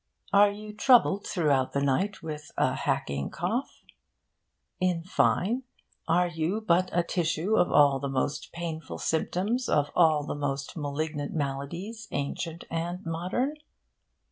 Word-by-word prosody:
Are 205 +1 +7
you 210 +1 -8
troubled 215 -3 +4
throughout 145 -9 +1
the 140 - +1
night 185 +10 0
with 150 -1 -6
a - - +2
hacking 70 0 -1
cough? - - -3
Are 75 - -17
you 180 - +3
in 165 -1 -6
fine, 210 +6 +1 0.5
are 175 +2 +3
you 170 +5 -1
but 185 -3 +2
a 175 - +2
tissue 170 +4 0
of 180 - +3
all 140 -2 +5
the 140 +1 -3
most 135 +2 -2
painful 165 -2 -5
symptoms 200 +9 -1
of 145 -1 +2
all 160 -4 +4
the - - -3
most 140 -2 -3
malignant 145 0 -3
maladies 170 +10 -4
ancient 160 +4 -3
and 170 +2 -3
modern? 185 - -1
165 Hz, 145 wpm, -28 LUFS, 145-190 Hz, 0.5 s, Are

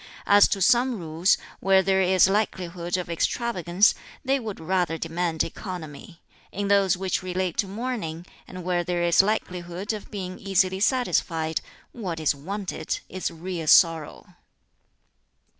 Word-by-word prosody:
As 205 0 +6
to 195 - 0
some 250 +1 +3
rules, 165 +1 +1 0.2
where 190 0 +4
there 190 0 +2
is 185 0 +5
likelihood 185 -4 -1
of 180 - -4
extravagance, 180 +1 +1 0.3
they 270 +1 +2
would 220 -5 -6
rather 170 -1 0
demand 165 0 -1
economy; 165 -1 -8 0.3
in 200 0 -3
those 195 -2 +3
which 190 -1 -1
relate 185 -1 -2
to 200 - +1
mourning, 200 -6 -4 0.2
and 185 -1 -8
where 175 0 0
there 175 0 -1
is 170 +1 +5
likelihood 185 -1 -3
of 210 - -8
being 185 -3 -6
easily 190 -1 +1
satisfied, 170 - 0 0.3
what 185 -9 -5
is 155 -2 +2
wanted 190 +8 -4
is 185 0 -3
real 170 -1 -6
sorrow." 165 -1 +4
185 Hz, 140 wpm, -25 LUFS, 170-200 Hz, 0.3 s, As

